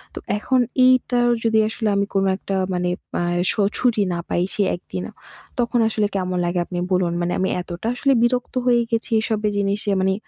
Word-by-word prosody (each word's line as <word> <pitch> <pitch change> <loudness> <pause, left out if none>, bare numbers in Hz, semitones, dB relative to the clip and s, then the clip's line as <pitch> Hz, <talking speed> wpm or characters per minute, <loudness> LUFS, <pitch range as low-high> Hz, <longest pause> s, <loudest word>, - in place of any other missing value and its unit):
তো - - -4 0.2
এখন 255 +5 +1 0.3
এইটা 255 -1 +3 0.2
যদি 225 -1 +3
আসলে 220 0 -3
আমি 200 0 +2
কোন 195 -1 +2
একটা 195 0 -4 0.2
মানে 180 0 0 0.3
আ - - 0 0.3
শো - - -1 0.2
ছুটি 235 -4 +2
না 170 - -2
পাই 175 - +1
সে 205 - +1
একদিন। 175 - -7 0.6
তখন 240 0 +1
আসলে 215 -1 0
কেমন 185 -1 -1
লাগে 175 +1 0
আপনি 180 - -6
বলুন? 180 -2 +1
মানে 175 0 -1
আমি 190 - +1
এতটা 175 +4 -6
আসলে 275 +2 +2
বিরক্ত 245 +1 0
হয়ে 240 -1 +4
গেছি 230 +2 -1
এসব 220 -1 -1 0.2
জিনিসে 200 +1 0
মানে 190 0 +2
205 Hz, 185 wpm, -21 LUFS, 185-235 Hz, 0.6 s, হয়ে